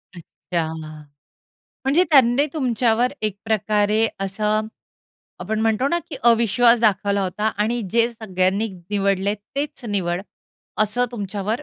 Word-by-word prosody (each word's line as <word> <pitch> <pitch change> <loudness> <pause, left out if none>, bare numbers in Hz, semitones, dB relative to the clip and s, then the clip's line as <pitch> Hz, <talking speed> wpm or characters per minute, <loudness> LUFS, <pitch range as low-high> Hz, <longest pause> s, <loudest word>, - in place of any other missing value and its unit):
अच्छा. 165 -1 -4 1.1
म्हणजे 305 +7 +3
त्यांनी 270 0 +5
तुमच्यावर 245 -3 +1
एक 215 -2 -1
प्रकारे 215 0 +2
असं 210 +2 -1 0.7
आपण 220 0 -2
म्हणतो 225 +4 +1
ना, 345 - +1
की 290 - -6
अविश्वास 235 +1 +4
दाखवला 200 -2 +2
होता 200 +3 -2
आणि 230 +3 0
जे 235 0 +4
सगळ्यांनी 200 0 -1 0.2
निवडलंय 200 0 +1 0.2
तेच 280 -2 -4
निवड, 180 -3 -1 0.6
असं 245 +4 +1
तुमच्यावर 205 +3 -3
215 Hz, 115 wpm, -21 LUFS, 200-240 Hz, 1.1 s, त्यांनी